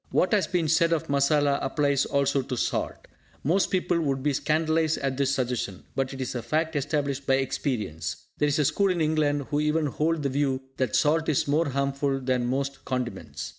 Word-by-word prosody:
What 185 - +2
has 205 -3 +3
been 175 -3 0
said 165 +2 +3
of 160 - -2
masala 140 0 +2
applies 140 0 +1
also 140 -1 +1
to 125 -1 -5
salt. - - -2 0.4
Most 180 +7 +2
people 180 -2 +1
would 135 -4 -1
be 145 -1 +1
scandalised 160 +2 +1
at 135 -1 -2
this 140 0 +1
suggestion, 125 -7 -2
but 135 -1 -1
it 135 - -8
is 130 -1 -3
a 120 - -3
fact 160 +4 -1
established 140 -1 -1
by 135 - +4
experience. 110 - -2 0.2
There 150 - +3
is 145 - +1
a 150 - +2
school 200 +7 +2
in 180 -2 0
England 150 -2 +1
who 145 - +1
even 150 +1 +1
hold 155 +2 0
the 140 - +1
view 135 -1 0
that 130 -5 0
salt 160 +2 +2
is 145 - +1
more 150 +2 +2
harmful 140 0 0
than 125 -2 0
most 135 +2 -2
condiments. 125 -2 -4
140 Hz, 200 wpm, -26 LUFS, 135-155 Hz, 0.4 s, by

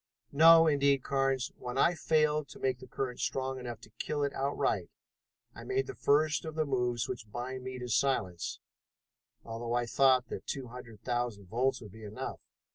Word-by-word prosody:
No, 165 +3 +8
indeed, 140 -3 +3
Carnes, 135 -2 0
when 125 +1 -5
I 170 - +4
failed 155 -3 +2
to - - -12
make 130 -2 0
the 130 - -11
current 125 -2 -4
strong 130 0 -2
enough 120 -3 -6
to 105 - -15
kill 145 -1 -1
it 140 - -1
outright 140 +1 0 0.6
I - - -10
made 400 +1 0
the 400 - -6
first 155 - +2
of 160 -2 -6
the 155 -1 +1
moves 125 -4 0
which 115 -4 -6
bind 125 +2 -5
me 130 0 -5
to 125 -1 -5
silence, 105 -9 0 0.8
although 115 +1 -4
I 120 0 +1
thought 130 +1 +4
that - - -6
two 135 -4 -4
hundred 115 -3 -11
thousand 120 -6 -2
volts 125 +5 +1
would 105 -4 -10
be 110 +2 -12
enough. 105 0 -6
130 Hz, 185 wpm, -31 LUFS, 120-140 Hz, 0.8 s, No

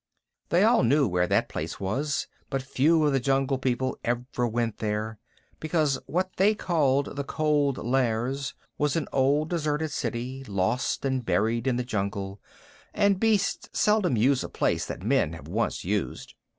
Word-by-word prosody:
They 175 +3 +4
all 230 +2 +5
knew 140 +3 +3
where 90 -2 +1
that - - +2
place - - -5
was, 135 +10 -1 0.2
but 135 -2 -2
few 155 +5 +3
of 145 - +2
the 135 - +3
Jungle 135 +1 +1
People 130 0 -1
ever 120 +1 -1
went 115 -1 -2
there, 110 0 -2 0.4
because 155 -3 +1
what 185 +2 -2
they 205 +3 +4
called 145 -8 +1
the 140 - -2
Cold 145 -2 +1
Lairs 130 +2 -1 0.2
was 150 -2 +1
an 165 - -1
old 145 +4 +2
deserted 155 -2 -1
city, 130 0 -3
lost 100 +6 -1
and 130 -2 0
buried 115 +2 0
in 130 - +2
the 125 - -1
jungle, 100 -3 -3 0.5
and 200 -2 +3
beasts 215 -3 +1
seldom 210 - +3
use 130 +4 +3
a - - -6
place - - 0
that - - -6
men 110 - +2
have 80 -2 -10
once 110 +3 -2
used. 100 +1 -2
135 Hz, 165 wpm, -27 LUFS, 115-150 Hz, 0.5 s, all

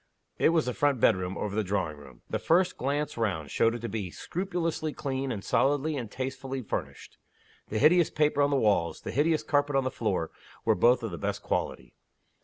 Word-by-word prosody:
It - - +5
was 165 -2 +2
the 125 - -2
front 145 -2 +1
bedroom, 95 -2 +2
over 105 -1 -3
the 110 - +1
drawing 95 -5 -1
room. 70 -4 -15
The - - -2
first 180 +2 +2
glance 145 +2 -2
round 90 -11 -1
showed 115 +1 +2
it 120 - -6
to 120 - -3
be 105 -5 -4
scrupulously 165 - -3
clean, 135 -2 -3
and 100 -4 -4
solidly 145 +3 +1
and 120 -6 -4
tastelessly 130 +1 -4
furnished. - - -6 0.5
The 110 - -2
hideous 170 +7 +5
paper 150 -1 +2
on 140 - +4
the 140 - +1
walls, 105 -9 +1
the - - -5
hideous 155 +4 +2
carpet 145 -1 +1
on 135 - +3
the 130 - -1
floor, 95 -7 -1 0.3
were - - +5
both 120 +6 +4
of 115 - -3
the 85 - -6
best - - -3
quality. - - -3
130 Hz, 205 wpm, -28 LUFS, 105-145 Hz, 0.5 s, It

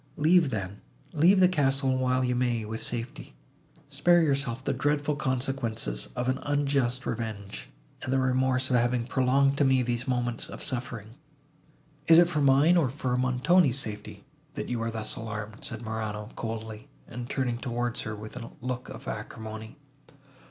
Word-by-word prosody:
Leave, 160 +1 +4
then, 100 -4 -4 0.3
leave 175 +5 +5
the 185 - +7
castle, 135 -5 +2
while 130 0 +1
you 125 - +1
may 120 -3 0
with 110 +1 -5
safety. 120 0 -5 0.5
Spare 165 +5 +4
yourself 135 -4 0
the 140 - 0
dreadful 145 +2 0
consequences 125 - -1
of 125 0 -2
an 130 +1 0
unjust 140 -3 0
revenge, 100 - -5 0.3
and 130 - -4
the 135 - +3
remorse 130 0 +2
of 125 - +5
having 120 0 +1
prolonged 135 +2 +2
to - - +5
me 130 -2 +4
these 120 +1 -1
moments 120 -2 -1
of - - -7
suffering." 120 -5 -5 0.9
"Is 165 - +8
it 175 0 +7
for 150 -4 0
mine, 140 +6 +5
or 150 -7 +3
for 130 -1 -2
Montoni's 130 +4 +3
safety, 105 -6 -5 0.3
that - - -4
you 120 -2 -1
are 115 - -1
thus 110 -1 -3
alarmed?" 110 -1 -6
said 115 0 -4
Morano, 110 -1 -4
coldly, 110 -1 -5 0.2
and 120 +1 -7
turning 125 -4 -1
towards 120 -2 -2
her 110 -1 -4
with 110 +2 -9
a 115 -2 -7
look 125 0 -4
of - - -9
acrimony. 110 +3 -7
125 Hz, 165 wpm, -28 LUFS, 115-140 Hz, 0.9 s, Is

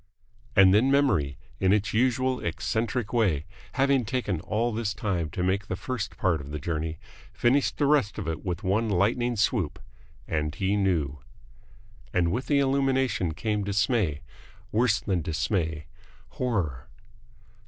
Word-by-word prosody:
And 95 -1 +7
then 115 +6 +4
memory, 115 - +2 0.2
in 95 - +3
its 105 -1 +1
usual 130 +2 +2
eccentric 115 0 -2
way, 95 -11 +2 0.3
having 135 -1 +3
taken 105 -6 -2
all 115 +5 -1
this 105 -3 -2
time 90 -7 -1
to 90 +3 -3
make 95 +2 0
the 95 - -2
first 115 +2 -4
part 85 -6 +1
of 70 - -9
the 75 - -4
journey, 80 +1 -3 0.3
finished 130 +4 +2
the 145 - +2
rest 140 -8 +2
of 100 -5 -4
it 80 0 -3
with 90 -3 -3
one 105 +4 +1
lightning 115 +6 +1
swoop, 105 - 0 0.5
and 75 0 -1
he 100 +1 0
knew. 80 -9 0 0.9
And 85 -2 +1
with 120 +7 -2
the 145 - +3
illumination 135 - +1
came 105 0 -1
dismay. 100 - +1 0.5
Worse 110 -1 +3
than 95 -5 -1
dismay. 80 -1 -1 0.4
Horror. 90 - -2
100 Hz, 145 wpm, -27 LUFS, 85-120 Hz, 0.9 s, And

